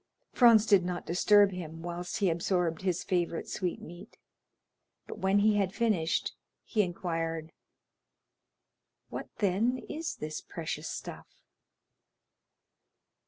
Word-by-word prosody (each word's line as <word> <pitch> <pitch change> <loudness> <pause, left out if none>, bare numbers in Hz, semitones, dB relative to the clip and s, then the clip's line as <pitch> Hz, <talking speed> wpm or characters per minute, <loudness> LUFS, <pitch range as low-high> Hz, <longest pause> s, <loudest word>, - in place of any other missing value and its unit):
Franz 230 -4 +6
did 200 -4 +5
not 175 0 -4
disturb 205 +3 +5
him 165 -3 -7
whilst 175 +1 -4
he 195 -4 +2
absorbed 170 0 0
his 185 -2 -1
favorite 175 -2 -1
sweetmeat, 175 -2 -5 0.9
but - - -8
when 190 +1 +2
he 210 +1 +4
had 195 0 0
finished, 200 -8 0 0.3
he 215 - +1
inquired: 165 -3 -3 1.6
"What, - - -6
then, 210 +6 +1
is 320 +1 -4
this 155 0 -5
precious - - -5
stuff?" - - -7
180 Hz, 110 wpm, -30 LUFS, 170-205 Hz, 1.6 s, Franz